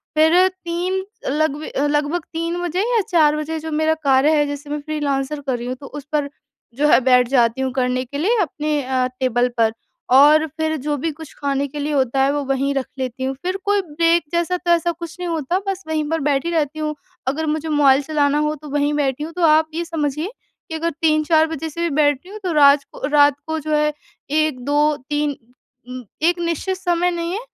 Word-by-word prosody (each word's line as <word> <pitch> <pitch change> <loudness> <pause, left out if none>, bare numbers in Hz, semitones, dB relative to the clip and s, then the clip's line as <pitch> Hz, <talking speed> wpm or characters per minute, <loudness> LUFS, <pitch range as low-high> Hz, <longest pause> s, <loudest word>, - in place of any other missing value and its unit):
फिर 325 +4 +5
3 370 +1 -3 0.3
लग 300 +1 +1
ब - - -7 0.2
लगभग 295 +3 0
3 335 +2 -2
बजे 350 +2 -1
या 450 - +4
4 310 -5 +4
बजे 315 +1 -3
जो 320 +1 -6
मेरा 315 +1 +2 0.2
कार्य 270 +3 +5
है 295 - +3
जैसे 285 0 -6
मैं 295 0 -2
फ़्रीलांसर 290 -1 -2
कर 260 -2 0
रही 240 +1 -6
हूँ 255 - -3
तो 275 - -8
उस 290 -2 -9
पर 290 -2 0 0.5
जो 295 +1 +3
है - - +6
बैठ 250 -1 +4
जाती 240 -1 +2
हूँ 265 -1 -1
करने 255 -1 0
के 280 +3 -7
लिए 425 +11 +1
अपने 300 -3 -1
अ, 255 -1 0
टेबल 250 -1 +1
पर। 225 -1 +3 0.4
और 300 +3 +7
फिर 315 0 0
जो 295 0 0
भी 325 +4 -2
कुछ 310 0 -11
खाने 280 0 0
के 295 +2 -7
लिए 295 +1 -2
होता 265 -1 +1
है 275 - +3
वो 290 0 -1
वहीं 275 +1 +1
रख 270 -2 -1
लेती 260 0 -4
हूँ, 265 +1 -1
फिर 370 +2 -1
कोई 410 0 +2
ब्रेक 335 +1 +1
जैसा 345 +1 0
तो 350 -1 -1
ऐसा 340 0 +3
कुछ 335 -1 -8
नहीं 360 - -3
होता 330 +2 -1
बस 390 -1 -3
वहीं 310 -1 -1
पर 325 0 0
बैठी 285 +3 0
रहती 310 -2 -1
हूँ 305 0 -2 0.3
अगर 295 +4 -1
मुझे 310 +1 -2
मोबाइल 285 -2 +4
चलाना 290 -1 +1
हो 300 0 0
तो 300 - -9
वहीं 290 +1 0
बैठी 285 -1 -1
हूँ। 325 +2 -6
तो 360 - -5
आप 315 0 +4
ये 335 +2 -2
समझिए 310 0 -2 0.4
कि 320 - -4
अगर 335 +1 -1
3-4 315 0 +3
बजे 320 0 -5
से 335 +3 -6
भी 340 - +1
बैठी 290 +2 +1
हूँ 425 +2 -8
तो 365 - -1
रात 285 -1 +6
को - - -5
रात 290 -1 +5
को 320 0 -2
जो 310 0 -1
है 300 0 +1 0.4
1-2-3 295 0 0 0.5
उम, 250 0 -7 0.2
एक 345 +2 +2
निश्चित 345 +3 -2
समय 355 -1 +1
नहीं 340 0 -3
है। 405 - -2
300 Hz, 220 wpm, -20 LUFS, 280-330 Hz, 0.5 s, और